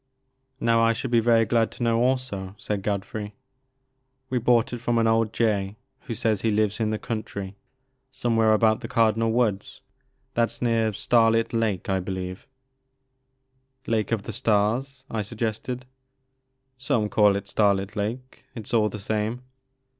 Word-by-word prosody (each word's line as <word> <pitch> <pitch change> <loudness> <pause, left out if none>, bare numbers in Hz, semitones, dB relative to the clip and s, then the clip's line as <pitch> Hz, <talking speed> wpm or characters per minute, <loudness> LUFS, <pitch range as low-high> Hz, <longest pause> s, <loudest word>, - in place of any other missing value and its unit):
Now 115 0 +3
I 115 0 +4
should 120 +2 -4
be 120 - +5
very 115 0 +4
glad 115 +1 +2
to - - -5
know 115 -1 +2
also,*' 125 -7 -1
said 105 -2 -3
Godfrey. 105 +1 -4 1.0
We 125 - +1
bought 120 +2 +2
it 120 - -4
from 120 -1 0
an 115 - +3
old 115 -1 +2
jay 105 -4 0 0.3
who 115 - -3
says 110 -2 0
he 115 - +1
lives 105 0 +1
in 110 -1 +1
the 110 - -1
country 100 -3 -5 0.6
somewhere 115 -4 +2
about 110 +1 +3
the 120 - -6
Cardinal 115 0 +2
Woods. 110 -4 -1 0.5
That 115 0 +2
's - - -6
near 115 -2 +1
Starlit 115 +2 +2
Lake, 110 -6 0
I 95 -1 +1
believe 95 0 -5 0.7
" 130 0 -47
Lake 110 -2 0
of 110 -3 0
the - - -6
Stars? 125 +4 0
'* - - -17
I 110 - -1
suggested. 115 +3 -4 0.9
Some 120 -5 0
call 105 -1 +4
it 100 0 -4
Starlit 100 0 +1
Lake, 120 +6 -5
— - - -41
^it 110 - -7
's - - -10
all 110 -2 +3
the 105 - -6
same. 110 +4 -2
115 Hz, 170 wpm, -25 LUFS, 105-120 Hz, 1.0 s, be